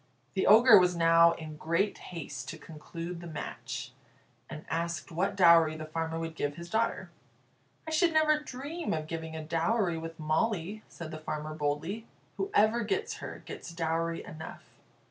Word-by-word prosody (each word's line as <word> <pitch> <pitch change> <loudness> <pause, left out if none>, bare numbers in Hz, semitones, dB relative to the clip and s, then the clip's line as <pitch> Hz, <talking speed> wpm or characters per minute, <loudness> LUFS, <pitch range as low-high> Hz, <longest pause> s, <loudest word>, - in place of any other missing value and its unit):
The 190 - +1
Ogre 220 0 +9
was 180 -1 +3
now 165 0 +6
in 155 -2 -8
great 170 +7 0
haste 145 -6 -6
to 160 - -6
conclude 165 +3 -7
the 175 - -8
match, 155 -3 -6 0.6
and 155 0 -8
asked 170 +1 -3
what 190 +4 0
dowry 170 -4 +6
the 155 - -6
farmer 160 +1 -3
would 165 0 -4
give 145 -2 -2
his 170 +2 -9
daughter. 225 +1 0 0.8
"I - - -3
should 335 +2 +3
never 310 -1 +4
dream 295 +4 -4
of 155 -1 -3
giving 160 0 -5
a 160 - -5
dowry 170 +3 +1
with 165 0 -7
Molly," 180 +5 0
said 165 -2 -8
the 155 - -6
farmer, 155 0 -4
boldly. 155 +9 -2 0.3
"Whoever 235 - +2
gets 210 - -2
her, - - -8
gets - - -8
dowry 165 0 -1
enough. 160 +1 -9
165 Hz, 165 wpm, -30 LUFS, 160-205 Hz, 0.8 s, Ogre